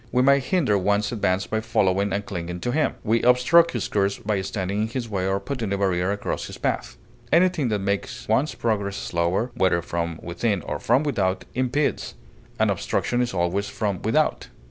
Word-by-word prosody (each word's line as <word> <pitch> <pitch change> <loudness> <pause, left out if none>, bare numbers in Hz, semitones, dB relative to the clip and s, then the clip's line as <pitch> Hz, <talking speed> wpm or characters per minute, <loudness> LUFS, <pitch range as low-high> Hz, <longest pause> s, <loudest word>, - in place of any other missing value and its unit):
We 125 - +3
may 140 +1 +5
hinder 130 - +1
one's 100 +2 +1
advance 100 -4 0
by 110 - -1
following 100 -1 +1
and 100 +1 -2
clinging 90 -2 -5
to 120 - -1
him; 155 +4 +1
we 115 +1 +2
obstruct 125 +8 +5
his 120 - -2
course 100 -1 0
by 105 -2 -1
standing 95 +1 -2
in 110 - 0
his 120 +1 -4
way 95 -3 -2
or 95 0 +1
putting 115 -1 -4
a 100 - +1
barrier 95 -2 +1
across 100 - -3
his - - -9
path. - - -2 0.3
Anything 170 -5 +3
that 105 - +1
makes 100 0 -3
one's 150 +4 +1
progress 100 -4 -1
slower, 85 +8 -1
whether 95 -7 +2
from 85 -1 -3
within 90 +2 -1
or - - -4
from 125 +6 +2
without, 100 -10 0
impedes; 130 +3 -1 0.4
an - - +3
obstruction 120 0 -1
is 120 - 0
always 95 +3 -1
from 100 -4 -2
without. 150 +8 +1
105 Hz, 190 wpm, -24 LUFS, 95-125 Hz, 0.4 s, may